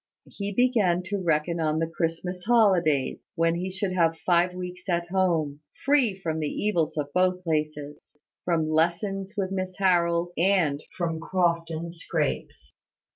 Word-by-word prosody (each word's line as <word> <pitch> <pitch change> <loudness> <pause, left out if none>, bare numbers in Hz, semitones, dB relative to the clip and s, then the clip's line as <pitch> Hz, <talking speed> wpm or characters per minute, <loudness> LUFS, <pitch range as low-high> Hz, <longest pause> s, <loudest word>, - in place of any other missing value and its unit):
He 200 0 -5
began 205 -7 +2
to 200 +2 -3
reckon 165 0 0
on 155 -1 +1
the 165 - +1
Christmas 165 +2 -3
holidays, 185 - +3 0.2
when 165 -1 +2
he 180 +2 -3
should 190 +1 -2
have 165 -3 +2
five 180 0 +3
weeks 180 +1 -7
at 170 0 0
home, 165 -6 +1 0.3
free 275 -8 +3
from 160 -4 -2
the 150 -2 -1
evils 175 -8 -1
of 145 -1 -3
both 185 0 +2
places, 150 -3 -3 0.3
from 165 -3 +1
lessons 190 +6 0
with 190 -2 -1
Miss 185 -1 -3
Harold, 175 -2 +2
and 170 -5 +2 0.2
from 165 -2 -1
Crofton 170 -1 -1
scrapes. 65 - -3
175 Hz, 145 wpm, -26 LUFS, 160-185 Hz, 0.3 s, holidays